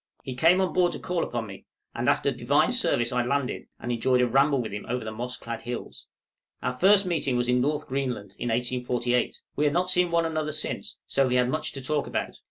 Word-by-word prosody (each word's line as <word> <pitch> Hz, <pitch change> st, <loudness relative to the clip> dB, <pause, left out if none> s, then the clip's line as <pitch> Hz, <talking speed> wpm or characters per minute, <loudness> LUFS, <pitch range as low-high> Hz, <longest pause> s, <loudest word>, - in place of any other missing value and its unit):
He 130 Hz, -, -5 dB
came 165 Hz, +8 st, +4 dB
on 185 Hz, -, 0 dB
board 180 Hz, -1 st, +3 dB
to -, -, -4 dB
call 180 Hz, -1 st, -1 dB
upon 120 Hz, -2 st, -3 dB
me, 95 Hz, -2 st, -11 dB, 0.3 s
and -, -, 0 dB
after -, -, +2 dB
Divine -, -, +2 dB
service 120 Hz, +1 st, +2 dB
I 125 Hz, -1 st, +1 dB
landed, 140 Hz, +1 st, -2 dB
and 120 Hz, -, -4 dB
enjoyed 125 Hz, +2 st, +2 dB
a -, -, +3 dB
ramble 135 Hz, +3 st, +3 dB
with 115 Hz, -3 st, -3 dB
him 105 Hz, -, -5 dB
over 125 Hz, -2 st, -2 dB
the 110 Hz, -, -4 dB
moss 125 Hz, +3 st, -4 dB
clad 115 Hz, 0 st, -6 dB
hills. 120 Hz, 0 st, -7 dB, 0.6 s
Our 125 Hz, -, 0 dB
first 195 Hz, +9 st, +5 dB
meeting 155 Hz, -8 st, 0 dB
was 120 Hz, 0 st, 0 dB
in 125 Hz, 0 st, +3 dB
North 150 Hz, +2 st, 0 dB
Greenland, 130 Hz, -7 st, -3 dB
in 120 Hz, -, -2 dB
1848; 125 Hz, +1 st, 0 dB
we 150 Hz, -, +1 dB
had 145 Hz, -, +2 dB
not 180 Hz, +2 st, +2 dB
seen 180 Hz, -1 st, +3 dB
one 170 Hz, 0 st, +2 dB
another 155 Hz, -2 st, -2 dB
since, 155 Hz, -, -1 dB
so 135 Hz, -1 st, +1 dB
we 125 Hz, -, +1 dB
had 125 Hz, 0 st, +3 dB
much 155 Hz, -, -1 dB
to 135 Hz, -, -6 dB
talk 150 Hz, +1 st, 0 dB
about. -, -, -3 dB
130 Hz, 230 wpm, -26 LUFS, 120-155 Hz, 0.6 s, first